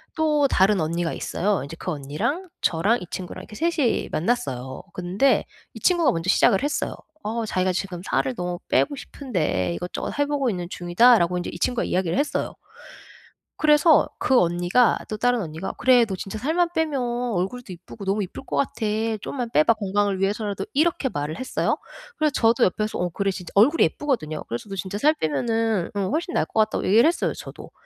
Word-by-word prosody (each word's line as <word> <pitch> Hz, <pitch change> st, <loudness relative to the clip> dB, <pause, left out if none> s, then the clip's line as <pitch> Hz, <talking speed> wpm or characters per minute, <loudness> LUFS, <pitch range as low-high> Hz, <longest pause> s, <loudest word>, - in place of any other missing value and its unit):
또 300 Hz, -3 st, +2 dB
다른 195 Hz, -4 st, +3 dB
언니가 165 Hz, +1 st, -1 dB
있어요. 195 Hz, -6 st, -1 dB
이제 145 Hz, +3 st, -8 dB
그 180 Hz, -, -3 dB
언니랑 155 Hz, -, -3 dB
저랑 195 Hz, +8 st, +2 dB
이 -, -, -6 dB
친구랑 180 Hz, -1 st, -6 dB
이렇게 210 Hz, -, -12 dB
3 335 Hz, +3 st, -1 dB
이 245 Hz, -5 st, +1 dB
만났어요. 135 Hz, -, -2 dB
근데 185 Hz, +9 st, +1 dB, 0.3 s
이 -, -, -9 dB
친구가 340 Hz, -7 st, +3 dB
먼저 165 Hz, 0 st, -3 dB
시작을 195 Hz, +4 st, +4 dB
했어요. 295 Hz, -, -1 dB, 0.3 s
어 225 Hz, +2 st, -2 dB
자기가 185 Hz, -2 st, 0 dB
"지금 180 Hz, -2 st, -4 dB
살을 135 Hz, -5 st, -1 dB
너무 175 Hz, 0 st, -3 dB
빼고 285 Hz, -, +2 dB
싶은데 165 Hz, -, -2 dB
이것저것 180 Hz, -, -5 dB
해보고 285 Hz, -3 st, +1 dB
있는 180 Hz, -4 st, -3 dB
중이다."라고 180 Hz, 0 st, +4 dB
인제 175 Hz, -, -3 dB
이 170 Hz, -, -8 dB
친구가 245 Hz, +4 st, 0 dB
이야기를 180 Hz, +2 st, 0 dB
했어요. 290 Hz, +1 st, -1 dB, 1.0 s
그래서 300 Hz, +1 st, +5 dB
그 255 Hz, -1 st, +4 dB
언니가 175 Hz, +7 st, +3 dB
또 215 Hz, -, -3 dB
다른 245 Hz, 0 st, +2 dB
언니가 160 Hz, +2 st, -5 dB
"그래 250 Hz, -2 st, +5 dB
너 195 Hz, -3 st, -4 dB
진짜 195 Hz, +3 st, -6 dB
살만 335 Hz, +7 st, +1 dB
빼면 310 Hz, -5 st, 0 dB, 0.3 s
얼굴도 195 Hz, +3 st, -3 dB
이쁘고 190 Hz, +4 st, -11 dB
너무 200 Hz, +2 st, 0 dB
이쁠 190 Hz, +8 st, -9 dB
것 -, -, -4 dB
같아. 255 Hz, -5 st, -1 dB, 0.3 s
좀만 245 Hz, +2 st, -4 dB
빼봐 155 Hz, +4 st, +4 dB
건강을 200 Hz, -2 st, 0 dB
위해서라도." 200 Hz, 0 st, -1 dB
이렇게 300 Hz, -2 st, +1 dB
말을 145 Hz, -, -4 dB
했어요. 260 Hz, -, -1 dB, 0.4 s
그래서 305 Hz, -1 st, +2 dB
저도 230 Hz, 0 st, +3 dB
옆에서 215 Hz, +3 st, -1 dB
"어 180 Hz, 0 st, 0 dB
그래" 195 Hz, +3 st, -1 dB
진짜 180 Hz, -2 st, -8 dB
얼굴이 265 Hz, +11 st, +5 dB
예쁘거든요. 195 Hz, -, -1 dB
그래서 120 Hz, -, -5 dB
"너 195 Hz, -, -5 dB
진짜 195 Hz, +2 st, -4 dB
살 305 Hz, +4 st, +4 dB
빼면은 225 Hz, -, 0 dB
어 -, -, -1 dB
훨씬 335 Hz, +3 st, -2 dB
나을 -, -, +2 dB
것 220 Hz, -, -3 dB
같다."고 215 Hz, 0 st, +1 dB
얘기를 220 Hz, +8 st, +5 dB
했어요 340 Hz, -, 0 dB
저도. -, -, -10 dB
205 Hz, 405 characters per minute, -24 LUFS, 175-260 Hz, 1.0 s, 그래서